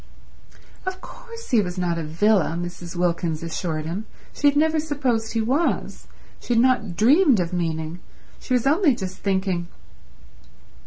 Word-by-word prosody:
Of 375 0 -4
course 465 +3 -11
he 235 -4 +5
was 180 -1 -4
not 175 -2 0
a - - -3
villa, 170 +1 +2
Mrs. 175 0 -6
Wilkins 170 -2 -1
assured 160 -1 -3
him; 190 +7 -4 0.3
she 290 - +2
had 285 0 +3
never 315 +1 +3
supposed 260 -8 -1
he 225 - +1
was; 270 +9 -1 0.3
she 240 - -1
had - - +4
not 235 -8 +1
dreamed 265 - +5
of 175 0 -2
meaning... 165 -1 -2 0.4
she 255 - -1
was 245 - 0
only 300 -1 +4
just 190 -4 -6
thinking 190 -3 -1
200 Hz, 155 wpm, -23 LUFS, 175-270 Hz, 0.4 s, he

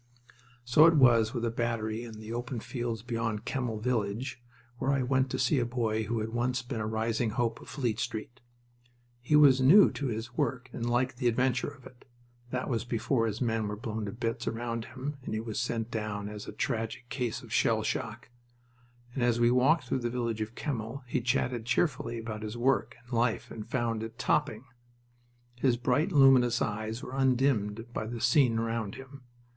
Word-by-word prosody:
So 150 +6 +7
it 165 - +5
was 120 -5 +5
with 120 -3 -2
a 115 - 0
battery 115 -1 -2
in 115 -2 -8
the 110 +1 -7
open 120 +1 -3
fields 120 -2 -4
beyond 115 -3 -2
Kemmel 125 -5 -2
village, 120 +1 -2 0.4
where 135 - +1
I 135 -2 +1
went 130 +1 +1
to - - -2
see 130 +2 +2
a - - +2
boy 110 -3 -1
who 115 +1 -1
had 110 - -3
once 125 +2 -1
been 120 -2 -4
a 105 - -2
rising 110 +1 0
hope 115 +1 -1
of - - -12
Fleet 120 -6 -2
Street. 120 +1 -4 0.8
He 125 +5 +2
was 140 -3 +7
new 175 +11 +7
to 140 - -3
his 115 +1 -4
work 130 0 -1
and 120 0 -2
liked 125 +1 +1
the 125 -1 0
adventure 125 +1 +1
of 140 -3 -10
it 125 - -15 0.4
that 125 +1 -2
was 115 -3 -1
before 120 0 0
his 110 +2 -4
men 115 -3 0
were 105 - -3
blown 110 0 -4
to 100 - -4
bits 115 +1 -3
around 115 0 -2
him 135 +3 -6
and 110 - -4
he - - -1
was 110 0 -4
sent 120 -1 -2
down 105 -2 -3
as 105 0 -8
a - - -5
tragic 115 +2 -3
case 125 -4 -3
of - - -9
shell - - +2
shock - - -3 0.8
and 130 - -3
as 120 -1 +2
we 120 0 +4
walked 135 +5 +4
through 130 +1 -1
the 120 -1 -2
village 115 -2 -2
of 110 +2 -4
Kemmel 125 -2 -4
he 125 +1 -1
chatted 120 -1 0
cheerfully 125 -5 0
about 110 -2 -5
his 110 +2 -5
work 120 -2 +1
and 120 +1 -11
life 115 -1 0
and 105 - -7
found 115 -3 -1
it 115 +1 -7
topping. 140 -5 0 0.9
His 125 -2 +3
bright, 130 +9 +1
luminous 130 -5 +6
eyes 110 +2 -3
were 125 - -7
undimmed 125 -4 +1
by 110 - -3
the 120 +1 -5
scene 125 -3 +4
around 115 -2 -2
him. 135 +1 -11
120 Hz, 195 wpm, -30 LUFS, 110-130 Hz, 0.9 s, So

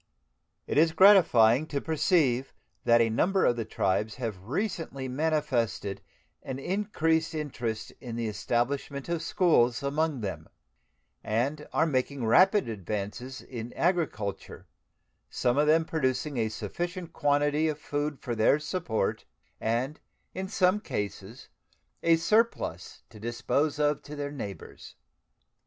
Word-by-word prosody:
It - - +1
is 160 0 +4
gratifying 155 - +6
to 145 - -2
perceive 150 -5 +1 0.3
that 115 0 +5
a 115 - +3
number 190 - +2
of 120 - +3
the 115 -2 -3
tribes 105 +1 -1
have 110 -7 -5
recently 160 - -3
manifested 130 -8 -1 0.4
an 130 -1 -5
increased 165 -2 0
interest 120 -7 -4
in 120 -3 -6
the 115 -1 -2
establishment 130 +7 -2
of 170 -1 -1
schools 140 -8 +2
among 145 -1 0
them, 100 -3 -5 0.7
and 135 +8 -1
are 160 - +2
making 135 -3 -1
rapid 190 - +5
advances 110 +4 -5
in 120 -1 -7
agriculture, 160 - -2 0.6
some 125 +3 +1
of 150 - +3
them 160 +1 +4
producing 140 -2 -1
a 110 -2 +1
sufficient 175 - -5
quantity 145 +1 +2
of 155 -2 -1
food 145 -1 -3
for 120 - -4
their 110 +5 +4
support 150 - -2 0.3
and 125 +7 -1 0.3
in 190 +1 -4
some 190 0 +2
cases 105 - -5 0.5
a 165 0 +5
surplus 190 - 0
to 105 - -13
dispose 120 +7 -1
of 150 -1 +1
to 150 - -9
their 145 -1 -4
neighbors. 100 - -8
140 Hz, 130 wpm, -28 LUFS, 115-160 Hz, 0.7 s, gratifying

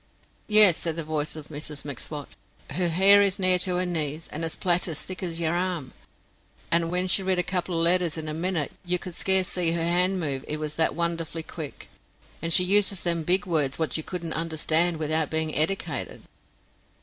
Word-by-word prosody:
"Yes," 210 -5 +7
said 165 -2 -3
the 165 - -4
voice 155 -1 -2
of 155 -2 -10
Mrs 150 -1 -6
M'Swat, 145 +1 -6 0.4
"her 180 -1 -1
hair 195 +4 +7
is 200 -2 +1
near 185 -1 +4
to 180 0 0
her 180 +1 0
knees, 160 -2 -2
and 155 - -4
a 165 - -1
plait 175 +2 +1
as 160 -4 -4
thick 185 - -7
as 170 -3 -4
yer 165 -1 0
arm; 175 -7 -3 0.8
and 165 0 +2
wen 180 +1 -1
she 185 +1 +2
writ 190 -1 0
a 180 - +2
couple 180 -2 -2
of 165 - +1
letters 175 -2 +2
in 160 -1 -5
a 155 - -3
minute, 165 -2 -2
you 180 0 0
could 180 0 -9
scarce 190 +1 +2
see 170 -2 0
her 170 -1 -2
hand 180 +3 +1
move 140 -5 -3
it 150 - -2
was 150 -1 -5
that 160 - +1
wonderful 165 -1 -3
quick; 155 -3 -9 0.5
and 165 - -2
she 180 - +6
uses 195 -1 +2
them 170 -1 0
big 185 +5 +1
words 150 -7 -1
wot 160 -1 -2
you 160 - -1
couldn't 170 0 -6
understand 165 +1 +1
without 155 0 0
bein' 160 -1 -1
eddicated." 160 -4 -1
170 Hz, 205 wpm, -25 LUFS, 155-180 Hz, 0.8 s, Yes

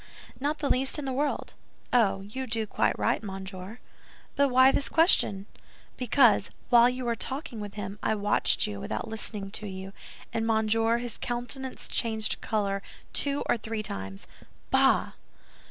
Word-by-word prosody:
Not 290 +3 -1
the 295 - -2
least 265 +2 +2
in 295 - -4
the 265 - -2
world." 285 +3 -1 0.4
"Oh, 220 -5 +3
you 255 +7 -6
do 225 -1 -1
quite - - 0
right, - - +1
monsieur." 190 0 -7 0.6
"But 280 -1 +3
why 260 +1 +6
this 275 - 0
question?" 265 - +3 0.5
"Because, 240 -4 +4 0.2
while 240 0 +7
you 250 0 -4
were 235 - +1
talking 260 -1 -4
with 205 -1 -7
him, 205 0 -6
I 220 - +1
watched 205 0 +2
you 100 -1 -5
without - - -4
listening 210 -2 -5
to 210 0 -4
you; 190 0 -7 0.4
and, 225 0 -1
monsieur, 225 +1 +2
his 240 -1 -6
countenance 250 +2 -4
changed 220 -2 0
color 200 -2 -1 0.3
two 280 0 +2
or - - +2
three 220 -1 -4
times!" 95 - -4 0.5
"Bah!" - - +4
225 Hz, 155 wpm, -28 LUFS, 205-255 Hz, 0.6 s, while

